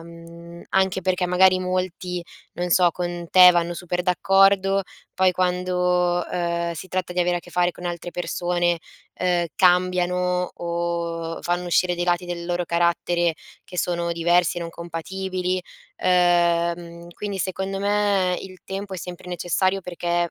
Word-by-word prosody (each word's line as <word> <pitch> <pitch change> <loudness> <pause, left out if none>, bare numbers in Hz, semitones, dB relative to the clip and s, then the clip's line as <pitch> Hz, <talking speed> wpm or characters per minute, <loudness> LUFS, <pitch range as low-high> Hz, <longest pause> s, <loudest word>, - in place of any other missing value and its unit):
mhmm, 170 +1 -12
anche 190 -1 +2
perché 180 0 0
magari 185 +1 +4
molti, 185 -1 -3 0.3
non 180 0 -3
so, 175 0 +5
con 175 0 -4
te 180 -1 +9
vanno 175 0 0
super 180 0 -3
d'accordo 195 +2 +3 0.3
poi 185 0 +4
quando, 180 -1 +1
uhm, 170 -1 -1
si 170 +3 -8
tratta 185 -1 -2
di 180 - 0
avere 175 0 +1
a - - -1
che 175 - -16
fare 175 0 +2
con 175 - -11
altre 175 0 -4
persone, 175 -1 0 0.4
uhm, 175 -1 +2
cambiano 180 0 +2
o 170 -1 -3
fanno 175 +1 -1
uscire 175 +1 +2
dei 175 0 -2
lati 175 0 +1
del 175 -1 -5
loro 175 0 -1
carattere 170 0 +1 0.3
che 180 - -11
sono 170 -1 -1
diversi 175 +1 +2
e - - -3
non 170 -1 -5
compatibili, 185 +2 -3 0.4
uhm, 175 -1 +3
mhmm, 170 0 -11
quindi 200 +2 -5
secondo 190 +2 -3
me 200 -3 +1
il 185 -1 -10
tempo 195 0 -5
è - - -4
sempre 180 0 -8
necessario 185 +2 0
perché, 175 -1 -1
180 Hz, 155 wpm, -23 LUFS, 170-185 Hz, 0.4 s, te